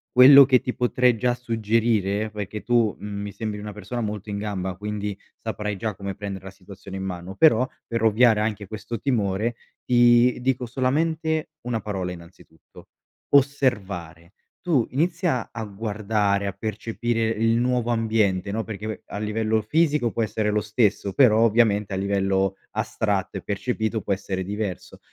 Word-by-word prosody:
quello 135 Hz, +3 st, +10 dB
che 130 Hz, -1 st, +4 dB
ti 125 Hz, -, -4 dB
potrei 125 Hz, 0 st, +2 dB
già 125 Hz, +2 st, +1 dB
suggerire, 110 Hz, -3 st, 0 dB
perché 105 Hz, 0 st, -6 dB
tu, 120 Hz, -3 st, +2 dB
mhmm, 100 Hz, -1 st, -5 dB
mi 100 Hz, 0 st, -5 dB
sembri 105 Hz, 0 st, -5 dB
una 105 Hz, 0 st, -6 dB
persona 105 Hz, +4 st, -5 dB
molto 105 Hz, -1 st, -4 dB
in 100 Hz, 0 st, -3 dB
gamba, 95 Hz, -3 st, -3 dB
quindi 105 Hz, 0 st, -4 dB, 0.2 s
saprai 105 Hz, -2 st, -3 dB
già 110 Hz, +1 st, -3 dB
come 100 Hz, 0 st, -5 dB
prendere 100 Hz, -1 st, -6 dB
la 95 Hz, -, -8 dB
situazione 95 Hz, 0 st, -11 dB
in 95 Hz, -, -4 dB
mano, 90 Hz, 0 st, -6 dB
però 125 Hz, -3 st, +5 dB, 0.2 s
per 115 Hz, -1 st, -2 dB
ovviare 110 Hz, 0 st, +4 dB
anche 105 Hz, -2 st, -2 dB
questo 110 Hz, +2 st, -6 dB
timore, 110 Hz, -3 st, 0 dB, 0.3 s
ti 120 Hz, 0 st, +5 dB
dico 125 Hz, 0 st, 0 dB
solamente 155 Hz, +6 st, -1 dB
una 120 Hz, -1 st, -2 dB
parola, 95 Hz, -4 st, -4 dB
innanzitutto: 85 Hz, 0 st, -15 dB, 0.5 s
osservare. 100 Hz, -, 0 dB, 0.3 s
Tu 155 Hz, -10 st, +2 dB
inizia 165 Hz, -, 0 dB
a 115 Hz, -, -5 dB
guardare, 105 Hz, -1 st, -1 dB
a 100 Hz, -, -1 dB
percepire 115 Hz, +3 st, -2 dB
il 115 Hz, +1 st, +1 dB
nuovo 125 Hz, -1 st, 0 dB
ambiente, 110 Hz, -5 st, +1 dB
no, 110 Hz, +2 st, -2 dB
perché 105 Hz, -1 st, -7 dB
ve 110 Hz, -, -5 dB
a -, -, -6 dB
livello 110 Hz, +1 st, 0 dB
fisico 150 Hz, -1 st, +1 dB
può -, -, -2 dB
essere 105 Hz, 0 st, 0 dB
lo 105 Hz, 0 st, +1 dB
stesso, 105 Hz, -2 st, 0 dB
però, 115 Hz, -4 st, +5 dB
ovviamente, 110 Hz, -3 st, +3 dB
a -, -, -1 dB
livello 95 Hz, 0 st, 0 dB, 0.2 s
astratto 100 Hz, -3 st, -1 dB
e -, -, -6 dB
percepito, 110 Hz, +1 st, -2 dB
può 100 Hz, -, -1 dB
essere 95 Hz, -1 st, -3 dB
diverso. 100 Hz, -1 st, -5 dB
110 Hz, 160 wpm, -24 LUFS, 100-120 Hz, 0.5 s, quello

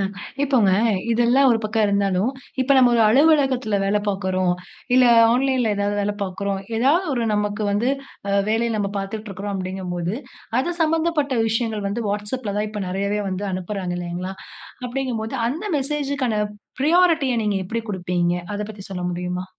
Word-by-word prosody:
அ -, -, +1 dB, 0.4 s
இப்போங்க, 260 Hz, -8 st, +3 dB, 0.4 s
இதெல்லாம் 240 Hz, +4 st, +4 dB
ஒரு 230 Hz, -, +3 dB
பக்கம் 215 Hz, 0 st, +1 dB
இருந்தாலும், 200 Hz, +1 st, +1 dB, 0.3 s
இப்ப 270 Hz, +2 st, +3 dB
நம்ம 255 Hz, -2 st, +6 dB
ஒரு 230 Hz, -, +4 dB
அலுவலகத்துல 265 Hz, -4 st, +3 dB
வேலை 205 Hz, +1 st, +1 dB
பாக்கிறோம். 185 Hz, -2 st, 0 dB, 0.4 s
இல்லை 255 Hz, -1 st, +6 dB, 0.2 s
ஆன்லைன்ல 255 Hz, -3 st, +2 dB
ஏதாவது 205 Hz, 0 st, 0 dB
வேலை 205 Hz, 0 st, -1 dB
பாக்குறோம். 195 Hz, +1 st, -2 dB, 0.2 s
ஏதாவது 285 Hz, +11 st, +3 dB
ஒரு 240 Hz, -2 st, 0 dB
நமக்கு 210 Hz, 0 st, -1 dB
வந்து, 210 Hz, +5 st, +1 dB, 0.4 s
அ -, -, 0 dB, 0.2 s
வேலைய 230 Hz, +2 st, +1 dB
நம்ப 200 Hz, -2 st, -1 dB
பாத்துட்ருக்குறோம் 200 Hz, 0 st, -5 dB
அப்டிங்கும்போது, 185 Hz, -1 st, -3 dB, 0.4 s
அது 305 Hz, +7 st, 0 dB
சம்பந்தப்பட்ட 315 Hz, -4 st, +1 dB
விஷயங்கள் 220 Hz, -2 st, -1 dB
வந்து, 220 Hz, +4 st, -2 dB
WhatsAppல 210 Hz, +1 st, -3 dB
தான் 210 Hz, +1 st, -1 dB
இப்ப 210 Hz, -1 st, -4 dB
நெறையவே 200 Hz, +3 st, -1 dB
வந்து 190 Hz, +2 st, -3 dB
அனுப்புறாங்க 185 Hz, 0 st, -3 dB
இல்லைங்களா! 175 Hz, +2 st, -4 dB, 0.5 s
அப்படிங்கும்போது, 245 Hz, -3 st, -3 dB
அந்த 320 Hz, +10 st, -4 dB
மெசேஜ்ஜுக்கான 275 Hz, -4 st, -1 dB, 0.4 s
ப்ரையாரிட்டிய 320 Hz, -2 st, +4 dB
நீங்க 205 Hz, -1 st, +1 dB
எப்படி 230 Hz, +4 st, -3 dB
குடுப்பீங்க? 175 Hz, -2 st, 0 dB, 0.2 s
அதை 205 Hz, -, -2 dB
பத்தி 200 Hz, -2 st, -10 dB
சொல்ல 180 Hz, -2 st, -4 dB
முடியுமா? 180 Hz, +1 st, -3 dB
210 Hz, 145 wpm, -22 LUFS, 195-255 Hz, 0.5 s, நம்ம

